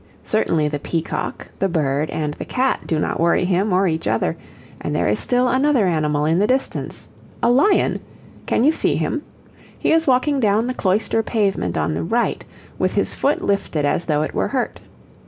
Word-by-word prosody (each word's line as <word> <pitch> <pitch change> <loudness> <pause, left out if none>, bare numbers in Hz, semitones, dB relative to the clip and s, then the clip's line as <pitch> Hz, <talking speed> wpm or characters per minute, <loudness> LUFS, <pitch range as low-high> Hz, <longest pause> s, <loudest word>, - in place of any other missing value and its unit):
Certainly 165 -8 +1
the 145 -1 -3
peacock, 165 +2 -4
the 195 - +1
bird, 150 -3 0
and 150 -1 -2
the - - -7
cat 260 +1 -1
do 160 - 0
not - - -1
worry 170 +2 +2
him 190 +3 +1
or 185 +2 +3
each 160 - -2
other, 110 -7 0 0.5
and - - -3
there - - +1
is 105 +1 +1
still 250 0 +1
another 260 -2 +3
animal 150 -4 +1
in 165 +3 +2
the 205 - +3
distance 260 +2 -2 0.4
a 235 - +4
lion! 290 +11 +3 0.5
Can - - +2
you 295 - +5
see - - 0
him? - - -1 0.6
He - - 0
is 325 -1 +3
walking 270 +2 +2
down 215 -1 +2
the 255 - -2
cloister 215 +1 +1
pavement 200 - -1
on 75 0 0
the 80 - -2
right, - - 0 0.4
with 185 - 0
his 200 - +1
foot 285 +2 0
lifted 180 -7 0
as 155 +4 0
though 150 -1 +1
it - - -4
were - - 0
hurt. - - -2
190 Hz, 190 wpm, -20 LUFS, 155-245 Hz, 0.6 s, you